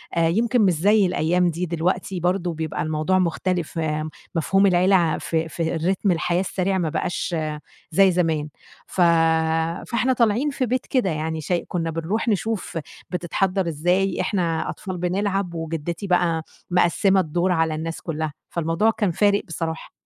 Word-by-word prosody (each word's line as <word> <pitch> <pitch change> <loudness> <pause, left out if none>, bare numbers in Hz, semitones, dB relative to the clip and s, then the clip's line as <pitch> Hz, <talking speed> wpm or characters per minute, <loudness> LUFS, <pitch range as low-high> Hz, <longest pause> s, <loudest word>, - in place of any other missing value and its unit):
آآ 165 -1 +3
يمكن 230 +6 +2
مش 190 -4 +4
زي 200 +5 +4
الأيام 180 0 +2
دي 170 +2 -2
دلوقتي 180 +2 -1
برضه 180 0 0
بيبقى 160 -1 -3
الموضوع 155 +4 +1
مختلف 175 -1 -1
آمم 155 0 -1 0.3
مفهوم 195 +5 +3
العيلة 185 +1 +4
ع 170 -3 +2
في 160 0 -1
في 165 0 -2
الرتم 185 +4 +1
الحياة 175 +1 +1
السريع 190 0 -1
ما 165 -4 0
بقاش 175 +1 -2 0.6
زي 190 +3 +5
زمان 160 -4 0 0.4
ف 185 - -2 0.9
فإحنا 250 +2 +2
طالعين 235 +4 +2
في 265 -2 -1
بيت 255 +2 -1
كده 250 -8 +1
يعني 160 0 -2
شاي 175 +3 -1
كنّا 165 -2 -2
بنروح 180 +9 -2
نشوف 215 -4 -1 0.3
بتتحضّر 185 +1 -1
إزاي 180 +5 +1
إحنا 170 -4 -1
أطفال 185 -2 -5
بنلعب 190 0 -1
وجدّتي 165 +3 -4
بقى 170 -3 +2 0.3
مقسّمة 185 +2 +3
الدور 175 +2 0
على 160 -2 +1
الناس 165 +1 -5
كلّها، 155 -2 -3 0.2
فالموضوع 170 +6 +1
كان 205 -5 0
فارق 205 +3 +3
بصراحة. 160 -1 -4
175 Hz, 155 wpm, -23 LUFS, 165-195 Hz, 0.9 s, زي